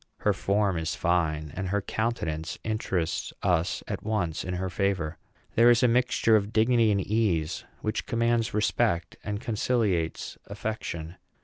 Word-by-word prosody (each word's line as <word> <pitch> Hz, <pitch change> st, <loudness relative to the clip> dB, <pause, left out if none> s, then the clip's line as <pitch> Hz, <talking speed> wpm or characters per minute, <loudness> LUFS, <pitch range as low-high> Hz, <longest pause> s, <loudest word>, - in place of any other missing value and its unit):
Her 105 Hz, -, +3 dB
form 100 Hz, -2 st, +1 dB
is 80 Hz, -1 st, -2 dB
fine, 80 Hz, -3 st, 0 dB
and 95 Hz, -, -3 dB
her 100 Hz, +2 st, +1 dB
countenance 85 Hz, -8 st, -2 dB
interests 95 Hz, -6 st, -1 dB
us 85 Hz, -1 st, +1 dB
at -, -, -3 dB
once 100 Hz, -7 st, -1 dB
in 90 Hz, +1 st, -3 dB
her 95 Hz, +1 st, -2 dB
favor. 90 Hz, -4 st, -1 dB, 0.3 s
There 115 Hz, +1 st, +6 dB
is 120 Hz, 0 st, +5 dB
a -, -, +7 dB
mixture 120 Hz, -2 st, +3 dB
of 105 Hz, 0 st, +1 dB
dignity 115 Hz, 0 st, +4 dB
and 100 Hz, -, +2 dB
ease 95 Hz, -7 st, 0 dB, 0.2 s
which 110 Hz, -, -2 dB
commands 115 Hz, 0 st, +1 dB
respect 105 Hz, -5 st, 0 dB
and 105 Hz, -1 st, -3 dB
conciliates 105 Hz, -7 st, -1 dB
affection. 100 Hz, -5 st, -5 dB
100 Hz, 145 wpm, -27 LUFS, 85-110 Hz, 0.3 s, a